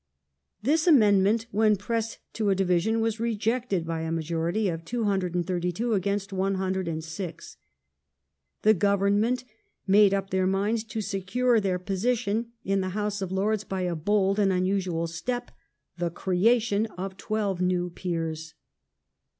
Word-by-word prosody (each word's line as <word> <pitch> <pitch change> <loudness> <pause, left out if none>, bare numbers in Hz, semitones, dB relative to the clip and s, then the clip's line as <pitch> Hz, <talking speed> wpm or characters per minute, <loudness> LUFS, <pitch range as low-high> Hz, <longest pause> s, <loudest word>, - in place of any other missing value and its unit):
This 310 +7 +2
amendment, 215 - +5
when 215 +1 +3
pressed 225 +3 -3 0.2
to 215 -2 0
a 195 - +3
division, 190 +4 +1
was 225 0 -1
rejected 225 -4 -1
by 165 -1 -3
a 160 0 -3
majority 165 +5 -1
of 165 -2 -3
232 185 0 -1
against 200 0 -1
106. 185 -3 -3 1.1
The 215 - +6
Government 205 +5 +2 0.4
made 200 0 +6
up 195 0 -1
their 185 0 +2
minds 205 +4 0
to 220 0 -4
secure 215 +5 +1
their 190 -3 0
position 220 +4 -1 0.2
in 195 0 +1
the 185 - -2
House 210 -1 -2
of 190 -1 -3
Lords 205 +2 0
by 190 -2 -4
a 180 -1 -1
bold 195 +4 +1
and 195 -2 +3
unusual 185 -2 0
step 245 +10 -4 0.2
— 140 +4 -51
the 175 -1 0
creation 210 +5 +2
of 190 +1 -5
twelve 200 -3 -2
new 180 -1 0
peers. 165 -3 -4
195 Hz, 135 wpm, -27 LUFS, 180-215 Hz, 1.1 s, The